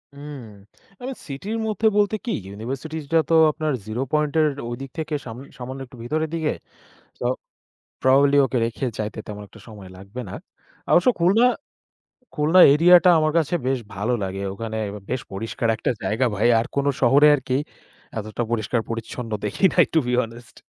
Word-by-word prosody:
উম! 145 -1 -8 0.6
তবে 260 +2 -5
সিটির 190 +11 -4
মধ্যে 215 +1 +1
বলতে 205 +1 +2
কি 235 - -2 0.2
ইউনিভার্সিটিটা 140 +9 -3
তো - - +2 0.2
আপনার 155 -1 -2
জিরো 110 +3 -3
পয়েন্ট 150 -1 +1
এর 155 - +3 0.2
ঐদিক 130 +3 -6
থেকে 160 -1 -4
সাম 115 -1 -7 0.2
সামান্য 130 +2 -7
একটু 125 0 -16
ভিতরের 155 +5 -1
দিকে। 160 -2 0 0.7
তো - - -6 0.8
প্রবাবলি 140 +2 +4
ওকে 130 -1 -1
রেখে 115 +4 -3
যাইতে 105 0 -4
তেমন 105 -1 -7
একটা - - -16
সময় 105 -4 -11
লাগবে 100 +6 -9
না। - - -7 0.6
অবশ্য 175 - +5
খুলনা, 200 +8 +5 0.9
খুলনা 155 +4 +3
এরিয়াটা 175 +4 +6
আমার 155 0 +1
কাছে 160 0 +1
বেশ 130 -1 +1 0.2
ভালো 105 +6 -1
লাগে। 95 0 -4
ওখানে 110 +2 -5 0.3
বেশ 125 0 -2
পরিষ্কার 115 +3 -3
একটা 110 - -1
জায়গা 115 +5 +1
ভাই। 105 +4 +2
আর 115 - -1
কোন 140 0 +1 0.2
শহরে 145 +2 +6
আরকি 130 -2 -3 0.6
এতটা 110 +2 -3
পরিষ্কার 115 +1 0
পরিচ্ছন্ন 115 0 -5
দেখি 105 - -5
নাই - - +5
টু 165 - +5
বি 125 - 0
অনেস্ট। 115 +1 -14
130 Hz, 160 wpm, -23 LUFS, 115-155 Hz, 0.9 s, এরিয়াটা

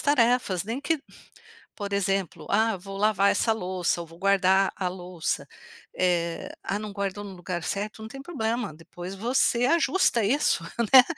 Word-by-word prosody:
tarefas, 245 -9 +2
nem 230 +6 -4
que 295 0 0 0.7
por 200 -2 -5
exemplo: 195 -2 -1
"Ah, 220 0 +2
vou 195 +2 -9
lavar 200 -1 +3
essa 225 - +2
louça 185 -5 -1
ou 170 - -6
vou 165 +1 -15
guardar 195 0 +3
a 185 - -1
louça". 180 -2 -3 0.5
Eh, 170 -2 0
"Ah, 200 +1 -2
não 210 -1 -6
guardou 200 0 -3
no 195 -2 -8
lugar 175 -1 -4
certo", 210 +4 -3
não 220 - -6
tem 270 +4 -9
problema, 235 - -2
depois 175 +3 -9
você 240 +3 +2
ajusta 330 - +3
isso, 245 - +2 0.3
né. 255 -1 +11
200 Hz, 160 wpm, -26 LUFS, 185-230 Hz, 0.7 s, né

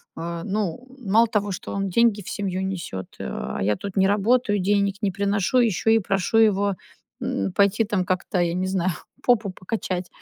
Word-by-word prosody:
а, 170 0 -5
ну, 210 +3 -3
мало 225 +1 +3
того, 210 -3 -1
что 185 - -6
он 195 0 -1
деньги 225 +1 +3
в - - -8
семью 190 -2 -2
несет, 170 - -5
а 65 +1 -4
я 105 +2 +2
тут 200 -2 -7
не 190 0 +5
работаю, 205 +1 +2
денег 200 +1 +1
не 200 -3 +1
приношу, 200 +4 +1
ещё 225 -2 +2
и 225 - +5
прошу 195 +2 0
его, 205 -2 +3 0.5
м, 95 -1 -2
пойти 200 +3 +3
там 200 -3 0
как-то, 185 0 -1
я 170 -1 +1
не 185 +1 -1
знаю, 185 -1 0 0.3
попу 225 -5 +2
покачать. 185 -1 -4
195 Hz, 180 wpm, -24 LUFS, 180-210 Hz, 0.5 s, не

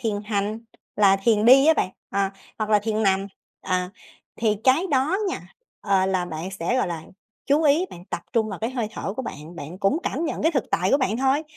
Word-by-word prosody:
thiền 210 -3 -2
hành 210 +2 -2 0.3
là 195 -2 +5
thiền 210 +1 +2
đi 265 +4 +7
á 320 - +6
bạn, 185 - 0 0.2
à, 195 0 0 0.3
hoặc 215 -1 -2
là 210 - +6
thiền 215 +1 -1
nằm. 195 -1 +2 0.3
À, 180 0 -1 0.5
thì 220 -2 +1
cái 270 +8 +4
đó 280 +6 +2
nha, - - -3 0.4
ờ, 195 -2 +2
là 190 -2 0
bạn 170 +1 -5
sẽ, 190 +5 -1
gọi 255 - +1
là, 170 -3 -4 0.4
chú 285 +3 +3
ý 310 +4 +3
bạn 175 - -11
tập - - -5
trung 220 -2 +1
vào 195 - -5
cái 225 +2 -2
hơi 240 -5 -2
thở 195 - -4
của 265 - -2
bạn, 160 - -8
bạn 160 +4 -8
cũng 200 +10 +2
cảm 310 +6 -2
nhận 325 - -3
cái 320 - +3
thực 270 -7 0
tại 185 +3 +1
của 275 - +4
bạn 250 -5 0
thôi, 270 +4 +2
215 Hz, 230 wpm, -24 LUFS, 190-260 Hz, 0.5 s, đi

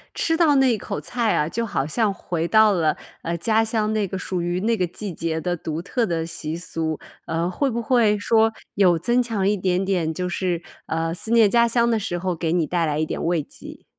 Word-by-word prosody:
吃 325 - +1
到 325 -3 +4
那 265 -3 +4
一 - - +1
口 190 - -5
菜 230 +8 0
啊， 150 - +1
就 230 +8 -2
好 205 -11 -1
像 205 +8 +1
回 170 -3 -3
到 220 +2 +5
了， 165 -5 +1 0.2
呃， 170 +1 -3
家 220 +6 +2
乡 220 -1 0
那 215 -2 0
个 190 - -4
属 180 -1 -3
于 175 +1 -1
那 230 +3 +2
个 185 -4 0
季 195 +2 -6
节 160 0 -2
的 175 +2 -1
独 160 -1 -4
特 230 +6 -1
的 165 -2 -1
习 165 -1 -4
俗， 160 -3 -3 0.3
呃， 165 +1 -1
会 275 +10 0
不 235 -1 -3
会 225 -3 +3
说 220 +2 +3 0.2
有 180 -4 +4
增 240 +9 +2
强 220 -5 -1
一 210 - +3
点 185 -1 0
点 180 -5 0
就 180 +3 -3
是， 175 -1 -2 0.2
呃， 165 +1 -1
思 180 - -3
念 230 -3 +6
家 235 0 +4
乡 235 0 +2
的 225 - +2
时 195 -4 -3
候 180 0 -2
给 165 0 -2
你 170 -2 +2
带 170 0 0
来 150 -1 -1
一 155 - +1
点 - - -4
慰 165 -2 +1
藉。 - - -12
185 Hz, 255 characters per minute, -23 LUFS, 165-225 Hz, 0.3 s, 念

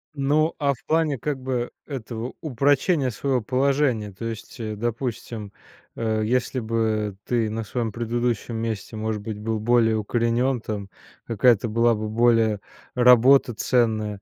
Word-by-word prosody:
Ну, 150 +3 +2
а 140 -2 +2
в 125 - -17
плане, 160 -3 +1
как 140 +3 -3
бы, 130 -2 -2 0.2
этого 120 -3 -5
упрочения 145 +1 +2
своего 130 +2 -1
положения, 130 -3 +1
то 100 +4 -8
есть, 115 +2 -7
э, 110 -2 -4
допустим, 115 -2 -4 0.4
э, 110 -1 -1
если 125 +3 0
бы 110 -3 -1
ты 115 -3 0
на 110 +1 -3
своем 115 +1 -3
предыдущем 120 +1 -2
месте, 110 -1 -4
может 110 -1 -3
быть, 105 -1 -5
был 110 +1 -2
более 115 0 +3
укоренен 120 +3 0
там, 105 -3 -5 0.4
какая-то 115 0 +3
была 115 +1 +3
бы 110 0 -4
более 115 -2 +3 0.3
работа 125 +1 +5
ценная, 110 -4 0
115 Hz, 145 wpm, -24 LUFS, 110-125 Hz, 0.4 s, работа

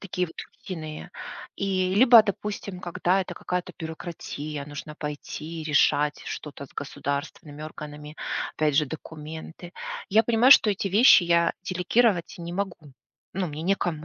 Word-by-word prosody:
такие 180 -2 -2
вот - - -14 0.3
сильные. 155 -2 -6 0.5
И 185 -1 +1
либо, 235 -1 +9
допустим, 200 -2 -4
когда 180 +2 +1
это - - -8
какая-то 180 0 -3
бюрократия, 155 -3 -6
нужно 150 +1 -8
пойти 155 +2 -6
и - - -8
решать 150 -1 +2
что-то 140 -1 -6
с - - -23
государственными 145 +1 -5
органами, 150 -1 -9 0.4
опять 150 -2 +2
же 150 - +5
документы. 160 +3 -8 0.4
Я 220 +3 +6
понимаю, 235 +3 +4
что 215 - +6
эти 195 0 -1
вещи 205 -2 +7
я 170 0 +3
делегировать 185 +1 +1
не 170 0 -6
могу, 175 -7 -4 0.4
ну, 190 -1 -1
мне 150 +2 -6
некому 175 -4 0
170 Hz, 140 wpm, -26 LUFS, 150-190 Hz, 0.5 s, либо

